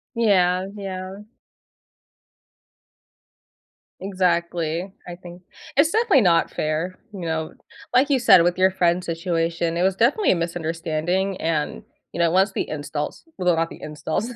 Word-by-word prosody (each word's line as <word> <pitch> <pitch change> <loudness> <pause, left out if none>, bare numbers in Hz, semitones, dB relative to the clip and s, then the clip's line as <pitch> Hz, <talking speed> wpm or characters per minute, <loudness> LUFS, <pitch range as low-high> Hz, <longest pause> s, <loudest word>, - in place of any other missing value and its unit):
Yeah, 185 -4 +2
yeah. 190 0 -6 2.8
Exactly. 175 -2 -1 0.2
I 175 - -6
think 175 0 -12 0.3
it's 305 +4 +4
definitely 440 - +4
not 170 -4 +3
fair, 160 +4 -2
you 190 - -7
know? 160 -1 -3 0.4
Like 275 +4 +4
you 270 -2 +3
said, 180 -7 +7
with 175 +1 +1
your 190 0 +4
friend's 180 -1 +1
situation, 165 0 -1
it 175 - -1
was 190 0 +2
definitely 265 - +3
a - - +3
misunderstanding 170 +2 -2
and, 160 +4 -2 0.3
you - - -5
know, 170 -1 +4
once 190 +3 +3
the - - -3
installs- 150 0 -5
well, 180 -2 +2
not 165 0 0
the - - -12
installs- 155 +8 -3
180 Hz, 140 wpm, -23 LUFS, 165-190 Hz, 2.8 s, said